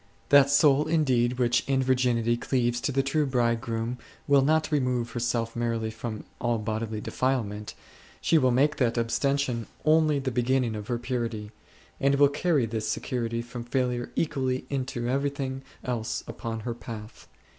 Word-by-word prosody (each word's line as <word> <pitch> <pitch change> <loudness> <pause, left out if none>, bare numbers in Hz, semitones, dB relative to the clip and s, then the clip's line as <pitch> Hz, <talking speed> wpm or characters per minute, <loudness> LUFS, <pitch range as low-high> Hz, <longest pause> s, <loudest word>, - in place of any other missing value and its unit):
That 140 -1 +7
soul 140 +1 +4
indeed 130 -7 +2
which 120 -1 +2
in 135 -1 +2
virginity 125 -3 +2
cleaves 120 0 0
to - - -1
the 135 0 +1
true 145 +2 +1
Bridegroom 120 -1 -1 0.3
will 140 -1 +5
not 155 +3 +2
remove 125 -5 0
herself 115 -1 -1
merely 115 -1 -1
from 110 -1 -6 0.2
all 120 -1 +1
bodily 110 0 -3
defilement; 105 -6 -2 0.4
she 165 - +3
will 130 -3 +3
make 140 +5 +2
that 120 -2 +1
abs 115 0 0
tension 140 -5 0 0.2
only 155 -1 +4
the 135 -1 -2
beginning 125 0 +1
of 105 -1 -6
her 120 - -1
purity, 115 -4 -3 0.5
and 140 0 +3
will 140 0 +5
carry 145 -2 +1
this 110 -1 -3
security 115 -2 -2
from 120 0 -7
failure 125 -1 -1
equally 130 -5 -1
into 130 -3 -2
everything 135 0 -1 0.2
else 120 -2 -2
upon 115 -2 -5
her 120 +2 -3
path. 115 -2 -9
125 Hz, 155 wpm, -27 LUFS, 115-135 Hz, 0.5 s, That